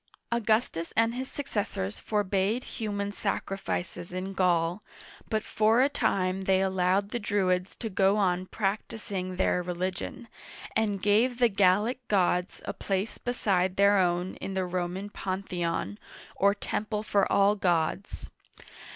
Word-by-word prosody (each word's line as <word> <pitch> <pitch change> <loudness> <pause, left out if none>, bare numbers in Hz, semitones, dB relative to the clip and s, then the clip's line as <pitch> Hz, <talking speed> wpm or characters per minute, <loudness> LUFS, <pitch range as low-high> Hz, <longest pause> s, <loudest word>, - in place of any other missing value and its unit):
Augustus 220 -7 +1
and 225 +1 +4
his 260 +2 -5
successors 205 - -3
forbade 205 +3 0
human 205 -3 -3
sacrifices 195 -3 -3
in 185 +2 -4
Gaul, 175 0 +1 0.5
but 215 -1 0
for 220 +4 +3
a 280 - +3
time 185 -7 0
they 190 0 +3
allowed 190 +1 +1
the 240 - -2
Druids 190 -3 0
to 230 - -5
go 195 0 +3
on 185 -2 +1
• - - -43
practicing 195 -2 -3
their 180 -1 +2
religion, 180 +5 -4 0.5
and 205 -4 0
gave 225 +4 +3
the 240 -1 +4
Gallic 205 +5 +3
gods 180 -2 +1
a - - -3
place 195 +2 -2
beside 190 -7 0
their 200 0 +5
own 175 0 0
in 195 - -5
the 190 -1 0
Roman 180 +3 -3
Panthe'on, 175 - -3 0.4
or 200 +1 +3
temple 210 +1 -3
for 200 -2 +1
all 200 +1 +5
gods. 175 -1 -1
195 Hz, 135 wpm, -28 LUFS, 185-210 Hz, 0.5 s, their